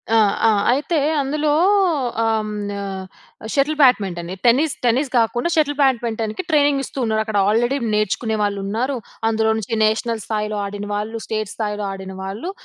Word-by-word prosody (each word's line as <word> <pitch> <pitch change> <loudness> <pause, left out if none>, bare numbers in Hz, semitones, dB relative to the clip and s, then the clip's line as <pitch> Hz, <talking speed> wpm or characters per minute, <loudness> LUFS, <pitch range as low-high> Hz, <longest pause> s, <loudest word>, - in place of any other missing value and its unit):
ఆ! - - +6 0.3
ఆ! - - +5 0.2
అయితే 290 +6 0 0.2
అందులో 295 +2 0 0.7
ఆహ్, 220 -1 0 1.1
షటిల్ 295 +2 +1
బ్యాడ్మింటన్ 190 -9 +3 0.2
టెన్నిస్, 265 +5 +4
టెన్నిస్ 255 +4 +2
కాకుండా 240 +6 +1
షటిల్ 290 -2 +1
బ్యాడ్మింటన్‍కి 230 0 0
ట్రైనింగ్ 290 -2 +3
ఇస్తూ 275 - -9
ఉన్నారు 220 0 +1
.అక్కడ 220 -2 -2
ఆల్రెడీ 240 +6 +2 0.2
నేర్చుకునే 215 +2 0
వాళ్ళు 205 -1 0
ఉన్నారు. 235 +7 -1 0.3
అందులో 220 0 +1
నుంచి 220 0 -4
నేషనల్ 220 +1 0
స్థాయిలో 210 -1 -2
ఆడిన 205 +1 -6
వాళ్ళు, 215 +2 -3
స్టేట్ 215 -2 -3
స్థాయిలో 210 -1 -3
ఆడిన 190 0 -7
వాళ్ళు, 200 - -5
225 Hz, 140 wpm, -20 LUFS, 210-270 Hz, 1.1 s, ఆ